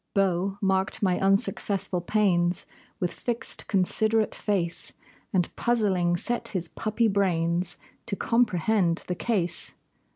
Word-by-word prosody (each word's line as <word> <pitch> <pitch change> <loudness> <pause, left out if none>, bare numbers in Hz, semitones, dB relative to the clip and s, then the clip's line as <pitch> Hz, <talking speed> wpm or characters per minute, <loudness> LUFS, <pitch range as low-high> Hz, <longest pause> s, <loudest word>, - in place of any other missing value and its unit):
Beau 195 0 +1
marked 195 +2 0
my 185 -2 +2
unsuccessful 195 -1 +2
pains 175 -3 +1 0.3
With 180 - -1
fixed, 240 +1 -3
considerate 215 +3 +2
face, 180 -5 -2 0.4
And 180 -4 0
puzzling, 190 -7 +1
set 240 +7 -2
his 180 -4 -2
puppy 225 +1 0
brains 175 -3 0 0.3
To 210 - -1
comprehend 205 -6 +1
the 180 - -2
case. 180 -3 -2
195 Hz, 110 wpm, -26 LUFS, 175-215 Hz, 0.4 s, my